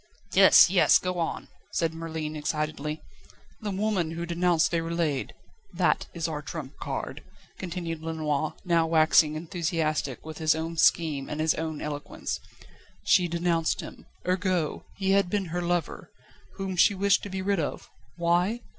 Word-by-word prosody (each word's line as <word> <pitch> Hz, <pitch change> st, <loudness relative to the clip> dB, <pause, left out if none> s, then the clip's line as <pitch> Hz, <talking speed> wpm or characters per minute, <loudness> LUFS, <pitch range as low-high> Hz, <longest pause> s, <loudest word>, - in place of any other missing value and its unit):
"Yes! -, -, +8 dB
Yes! -, -, +6 dB
Go 180 Hz, -1 st, -3 dB
on!" 165 Hz, -, -3 dB, 0.3 s
said 165 Hz, -1 st, 0 dB
Merlin 160 Hz, -1 st, -5 dB
excitedly. 150 Hz, 0 st, -3 dB, 0.6 s
"The 210 Hz, -, -3 dB
woman 195 Hz, -4 st, 0 dB
who 165 Hz, +1 st, -4 dB
denounced 170 Hz, -1 st, +2 dB
Déroulède 165 Hz, -4 st, -1 dB, 0.5 s
that -, -, +1 dB
is 170 Hz, -1 st, -3 dB
our 150 Hz, -2 st, -4 dB
trump 150 Hz, -2 st, -7 dB
card," -, -, -4 dB, 0.4 s
continued 170 Hz, -3 st, -4 dB
Lenoir, 155 Hz, -2 st, -2 dB
now 170 Hz, -2 st, +3 dB
waxing 155 Hz, -1 st, +4 dB
enthusiastic 155 Hz, -4 st, -2 dB
with 160 Hz, 0 st, -8 dB
his 155 Hz, -1 st, +3 dB
own 165 Hz, +1 st, -4 dB
scheme 155 Hz, -4 st, +2 dB
and 150 Hz, -, -4 dB
his 155 Hz, 0 st, +3 dB
own 160 Hz, -1 st, -4 dB
eloquence. 145 Hz, -1 st, -4 dB, 0.6 s
"She 180 Hz, -4 st, +4 dB
denounced 170 Hz, -1 st, 0 dB
him. -, -, -11 dB, 0.2 s
Ergo, 180 Hz, -4 st, 0 dB
he 195 Hz, -1 st, 0 dB
had 195 Hz, -2 st, +3 dB
been 200 Hz, 0 st, 0 dB
her 175 Hz, -, -1 dB
lover, 175 Hz, -1 st, -2 dB, 0.5 s
whom 195 Hz, -2 st, -4 dB
she 195 Hz, +3 st, +5 dB
wished 200 Hz, +1 st, +3 dB
to 205 Hz, -, -7 dB
be 190 Hz, 0 st, -4 dB
rid 200 Hz, -1 st, +1 dB
of 150 Hz, -, -3 dB, 0.3 s
why? 175 Hz, +7 st, +1 dB
165 Hz, 150 wpm, -27 LUFS, 155-180 Hz, 0.6 s, Yes